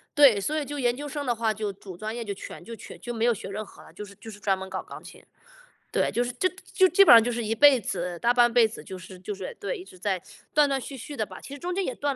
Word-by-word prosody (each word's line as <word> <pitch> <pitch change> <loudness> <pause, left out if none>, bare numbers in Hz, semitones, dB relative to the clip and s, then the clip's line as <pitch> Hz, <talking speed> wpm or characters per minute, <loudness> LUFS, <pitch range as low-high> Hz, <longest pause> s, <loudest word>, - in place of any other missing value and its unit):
对， 275 -8 +7
所 300 +10 -1
以 305 - 0
就 290 +1 -5
研 245 -2 +2
究 290 +3 -6
生 290 0 -4
的 240 -2 +1
话 225 -1 0
就 210 -1 -3
主 190 -2 -11
专 215 +4 -4
业 240 - -4
就 205 -2 -4
全 195 - -9
就 230 - -9
全 - - -11
就 240 - -5
没 230 0 0
有 240 - +4
学 205 - -8
任 210 +2 -4
何 - - -16
了， - - -15
就 - - -8
是 200 0 -14
就 225 - -11
是 205 - -12
专 195 -2 +1
门 190 0 -7
搞 - - -3
钢 - - -11
琴。 - - -13 0.7
对， - - +1
就 240 - 0
是 245 - -3
就 370 +9 +1 0.2
就 375 - +5
基 380 +5 +7
本 - - +10
上 230 -1 +9
就 245 - -1
是 240 0 -2
一 225 +1 -1
辈 285 0 +7
子 180 -4 -4
大 240 +1 +3
半 240 -1 +4
辈 235 -2 +6
子 220 - -10
就 190 - -8
是 185 +1 -11
就 195 +3 -5
是 480 - -7
对， - - -3
一 370 - -10
直 185 - -15
在 185 -1 -1 0.3
断 300 -1 +5
断 270 - 0
续 270 +1 -8
续 275 +4 -8
的 215 - 0
吧， - - -11
其 275 - -9
实 285 - -8
中 355 +3 -3
间 390 +2 0
也 255 - -3
断 285 -1 -1
235 Hz, 345 characters per minute, -26 LUFS, 205-280 Hz, 0.7 s, 本